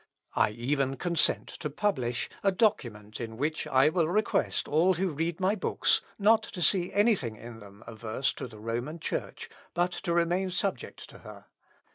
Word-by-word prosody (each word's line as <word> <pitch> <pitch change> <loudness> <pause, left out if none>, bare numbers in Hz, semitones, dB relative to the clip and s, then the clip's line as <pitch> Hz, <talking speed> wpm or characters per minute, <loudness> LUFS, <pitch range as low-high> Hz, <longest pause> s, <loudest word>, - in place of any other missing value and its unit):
I 110 - +3
even 135 +5 -1
consent 170 +1 +1
to 150 - -3
publish 130 - -1
a 200 -3 +3
document 120 - -1
in 115 -1 -6
which 155 +4 -2
I 135 +3 +4
will 165 -1 +1
request 210 +5 0
all 175 +5 +3
who 185 +3 0
read 165 +3 -2
my 190 +2 +2
books 210 - +2 0.2
not 220 +2 +5
to 190 -4 -8
see 180 +2 +3
any 210 +3 +4
thing 115 - -4
in 115 +1 -10
them 100 0 -14
adverse 115 +3 -2
to - - -6
the 110 -2 -13
Roman 120 +8 -3
Church, - - -4 0.3
but 175 +1 +1
to 175 0 -4
remain 175 +3 +1
subject 185 +2 -3
to - - -14
her. - - -12
155 Hz, 175 wpm, -29 LUFS, 120-185 Hz, 0.3 s, not